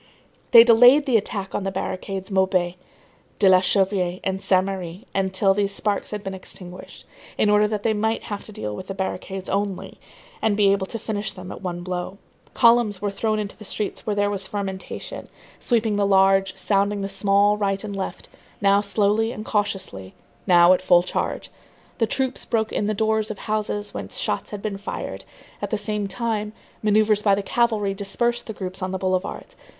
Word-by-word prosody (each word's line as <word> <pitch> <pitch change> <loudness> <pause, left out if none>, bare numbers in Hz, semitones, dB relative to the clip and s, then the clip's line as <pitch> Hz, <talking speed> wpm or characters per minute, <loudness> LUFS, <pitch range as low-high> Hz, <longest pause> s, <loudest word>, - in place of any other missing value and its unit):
They 230 -2 +10
delayed 245 +5 +7
the 260 -4 +1
attack 200 -2 -1
on - - -2
the 195 - -1
barricades 190 +1 -4
Maubuée, 190 -2 +1 0.6
de 200 - +4
la 185 -1 +7
Chanvrerie 185 -2 +1
and 190 0 -2
Saint 185 -1 +3
Merry 190 +1 -6
until 195 0 +2
these 200 0 -1
sparks 205 -2 -1
had 210 -1 -5
been 195 - -4
extinguished, 185 -1 -9 0.3
in 210 - +3
order 210 0 +4
that 210 -1 -3
they 225 - +2
might 220 +2 -1
have 205 -1 -5
to - - -8
deal 105 - -5
with 185 - -8
the 195 - -5
barricades 190 0 -4
only 200 -1 -3 0.4
and 215 -2 +1
be 200 -2 +5
able 195 -1 0
to 230 - -4
finish 215 -2 -4
them 185 -1 -9
at - - -9
one 175 -2 -4
blow. 180 +1 -4 0.4
Columns 230 -5 +4
were 205 +1 -2
thrown 215 +2 -1
into 205 -1 -4
the - - -12
streets 210 0 -4
where 215 -3 -2
there 205 0 +1
was 195 -1 -3
fermentation, 195 -2 -5 0.3
sweeping 225 -4 +1
the 200 -1 +2
large, 195 -1 +3
sounding 200 +1 +1
the 195 - -2
small, 200 +1 +3
right 200 -1 -1
and 205 -2 -5
left, 195 - -5 0.3
now 200 0 +4
slowly 210 +2 +1
and 215 -3 -7
cautiously, 190 - -3 0.3
now 175 -1 +7
at 185 - 0
full 175 -1 +5
charge. 180 - -3 0.5
The 225 - +2
troops 260 +1 -1
broke 220 -2 -1
in 205 - 0
the 215 - 0
doors 220 0 +1
of 215 - -5
houses 210 -1 -3
whence - - -5
shots - - -2
had 205 -1 -7
been 200 -2 -3
fired; 200 - -6 0.4
at - - -3
the 215 - 0
same 210 -1 -2
time, 215 -1 -2 0.3
manœuvres 210 0 +3
by 200 -2 +4
the 200 - -3
cavalry 215 -3 +1
dispersed 235 +4 -1
the 220 - -5
groups 190 -1 -6
on 185 - -2
the 190 - -2
boulevards. 185 - -3
200 Hz, 190 wpm, -23 LUFS, 190-215 Hz, 0.6 s, They